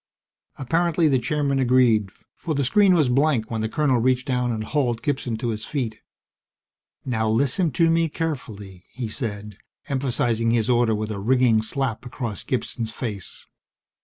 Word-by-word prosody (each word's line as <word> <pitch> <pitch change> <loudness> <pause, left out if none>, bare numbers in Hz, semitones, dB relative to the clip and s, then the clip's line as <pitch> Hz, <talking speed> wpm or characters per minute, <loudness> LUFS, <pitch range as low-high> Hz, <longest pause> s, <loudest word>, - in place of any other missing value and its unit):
Apparently 165 +4 +1
the 135 -3 +3
Chairman 140 +2 0
agreed, 120 -5 +3 0.2
for 160 -3 -4
the 140 - +1
screen 190 +7 +4
was 155 -5 +3
blank 125 -3 +1
when 110 -1 -2
the 110 - -1
colonel 135 -2 +1
reached 130 +1 +1
down 125 -3 0
and 110 -1 -3
hauled 120 -3 -1
Gibson 130 -5 -1
to 120 +1 -3
his 110 -1 -3
feet. 115 -7 -3 1.1
"Now, 110 -3 0
listen 140 - +1
to 165 +6 +3
me 165 0 +2
carefully!" 110 - -5
he 125 -2 -5
said, 105 -3 -6 0.3
emphasizing 120 -4 0
his 115 +1 +2
order 120 -2 +3
with 110 +1 -3
a 100 - -4
ringing 120 0 +3
slap 115 0 -3
across 120 -4 -5
Gibson's 120 -3 -3
face. 110 -4 -6
125 Hz, 160 wpm, -23 LUFS, 110-140 Hz, 1.1 s, screen